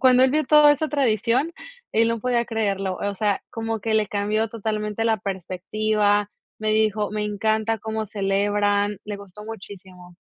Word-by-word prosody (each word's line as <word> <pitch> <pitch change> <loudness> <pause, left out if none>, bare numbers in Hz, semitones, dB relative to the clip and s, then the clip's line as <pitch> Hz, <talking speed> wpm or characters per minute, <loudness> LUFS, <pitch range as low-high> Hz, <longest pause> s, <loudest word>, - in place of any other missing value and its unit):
cuando 255 0 +6
él 260 - +3
vio 305 +2 +1
toda 300 -1 +7
esa 310 +2 -1
tradición, 260 +2 +1 0.4
él 225 +1 +3
no 230 -1 -1
podía 240 -1 +1
creerlo, 195 -5 -1
o 200 0 -2
sea, 205 -1 0
como 225 -1 -3
que 220 +1 -1
le 215 -2 +2
cambió 210 +2 0
totalmente 215 0 -3
la 225 -1 +2
perspectiva, 205 +2 0 0.3
me 215 0 -1
dijo: 215 -1 +1
"Me 210 0 -2
encanta 220 +2 0
como 220 0 -3
celebran", 205 0 0
le 205 -1 -5
gustó 200 +1 -12
muchísimo. 185 -5 -11
215 Hz, 165 wpm, -23 LUFS, 205-225 Hz, 0.4 s, toda